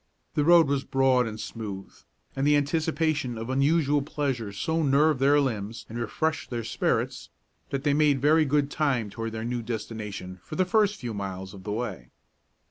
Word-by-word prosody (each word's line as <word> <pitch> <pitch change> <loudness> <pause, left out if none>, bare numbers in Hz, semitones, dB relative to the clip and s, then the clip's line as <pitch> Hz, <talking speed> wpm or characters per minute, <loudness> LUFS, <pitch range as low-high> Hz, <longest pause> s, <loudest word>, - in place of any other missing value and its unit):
The 150 - +1
road 170 0 +6
was 140 -1 0
broad 130 -2 +2
and 110 0 -6
smooth, 100 -5 -6 0.4
and 135 +1 +1
the 150 - +5
anticipation 150 -3 0
of 115 +3 -4
unusual 145 +1 +2
pleasure 135 -7 -2
so 160 +12 -1
nerved 145 0 +3
their 140 +2 +5
limbs 115 -5 -2
and 115 +2 -5
refreshed 155 +7 -2
their 120 -2 -3
spirits - - -1 0.4
that 135 0 -3
they 145 -1 +2
made 145 -2 +3
very 155 +4 +4
good 145 0 +1
time 130 -9 0
toward 115 +1 -4
their 110 0 -5
new 120 0 -2
destination 105 -5 -6
for 155 - -8
the 185 - +2
first 210 +1 +2
few 120 - -5
miles 95 -2 -5
of 95 -1 -12
the 105 - -3
way. 105 - -4
135 Hz, 180 wpm, -27 LUFS, 110-150 Hz, 0.4 s, road